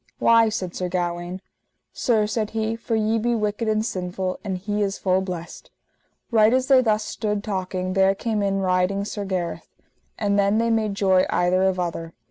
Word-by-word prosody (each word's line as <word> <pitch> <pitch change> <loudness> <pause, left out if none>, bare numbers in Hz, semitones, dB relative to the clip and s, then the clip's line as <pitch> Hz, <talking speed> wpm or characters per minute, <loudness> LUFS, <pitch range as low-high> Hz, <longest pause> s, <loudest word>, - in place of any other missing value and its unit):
Why? 230 -1 +5
said 185 -5 -4
Sir 180 -1 -3
Gawaine. 175 0 -3 0.5
Sir, 220 -4 +1
said 215 0 -2
he, 220 +1 0
for 230 0 -3
ye 220 +1 +1
be 240 +2 +1
wicked 210 +1 -1
and 215 0 +1
sinful, 185 -2 -3
and 190 -3 -3
he 205 +3 -2
is 200 -1 -1
full 185 0 +1
blessed. 180 -3 -7 0.6
Right 220 +1 +5
as 260 0 +1
they 265 -1 +5
thus 215 -3 +1
stood 210 -2 -3
talking 185 -2 -3
there 195 0 +3
came 215 0 -2
in 195 -1 0
riding 185 +2 +1
Sir 205 -1 -4
Gareth. 185 -3 -3 0.5
And 205 -1 +1
then 200 +1 +3
they 230 0 +1
made 215 -3 0
joy 190 -2 +3
either 180 +1 +2
of 190 -1 +1
other. 165 -2 -3
200 Hz, 185 wpm, -23 LUFS, 185-220 Hz, 0.6 s, Why